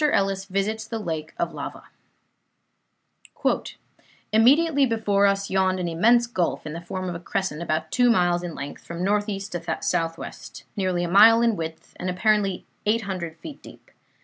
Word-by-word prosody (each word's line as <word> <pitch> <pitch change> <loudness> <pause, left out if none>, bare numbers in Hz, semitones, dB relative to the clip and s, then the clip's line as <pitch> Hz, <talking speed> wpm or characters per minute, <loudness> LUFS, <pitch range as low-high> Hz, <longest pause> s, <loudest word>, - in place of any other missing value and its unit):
ELLIS 195 0 +1
VISITS 205 +3 -2
THE 225 - -4
LAKE 160 -6 -4
OF - - -2
LAVA - - -7 2.5
"Immediately 280 +5 +5
before 205 -3 +2
us 200 0 0
yawned 190 -1 +2
an 180 - -2
immense 230 +9 +4
gulf, 185 -11 -2
in 150 - -5
the 170 - -6
form 185 +2 -5
of 180 - -3
a 170 - -6
crescent, 180 -3 -3
about 160 -1 -2
two 245 -1 +4
miles 175 -5 +3
in 175 -2 -6
length, 145 - -7
from 170 +1 -5
northeast 205 0 -1
to 175 -1 -3
southwest; 165 0 -3
nearly 185 -3 0
a - - -1
mile 225 +6 +7
in 230 -2 +3
width, 160 -2 -7
and 180 - -3
apparently 195 0 +1 0.2
800 190 -7 -1
feet 285 - -10
deep. - - -15
195 Hz, 160 wpm, -24 LUFS, 175-220 Hz, 2.5 s, mile